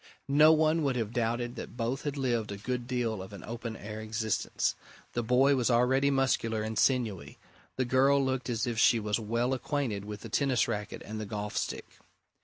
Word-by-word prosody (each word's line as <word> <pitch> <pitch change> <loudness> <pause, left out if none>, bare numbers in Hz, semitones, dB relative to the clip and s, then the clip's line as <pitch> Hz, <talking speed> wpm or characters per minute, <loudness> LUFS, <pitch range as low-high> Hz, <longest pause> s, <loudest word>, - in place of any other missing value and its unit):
No 150 +3 +6
one 160 +1 +3
would 140 -4 +1
have 115 -2 -2
doubted 120 +1 -1
that - - -8
both 125 +4 -2
had 145 -1 -2
lived 120 -6 -1
a 100 - -5
good 120 +3 -3
deal 120 -5 -1
of 95 +2 -9
an 100 - -9
open 115 0 -5
air 110 +1 -7
existence: 110 0 -1 0.4
the 120 - 0
boy 125 +4 +4
was 125 -2 +1
already 130 +3 +3
muscular 125 -5 +1
and 110 +1 -4
sinewy: 105 - 0 0.4
the 130 - 0
girl 135 +3 +4
looked 130 -1 -1
as 115 -2 0
if 120 -3 -2
she 115 - +5
was 105 +1 -1
well 115 +4 0
acquainted 130 -5 -2
with 105 -1 -7
the - - -7
tennis 135 -4 +2
racket 105 -3 -4
and 110 0 -5
the 105 - -5
golf 105 0 -4
stick. - - -4
120 Hz, 200 wpm, -30 LUFS, 110-130 Hz, 0.4 s, No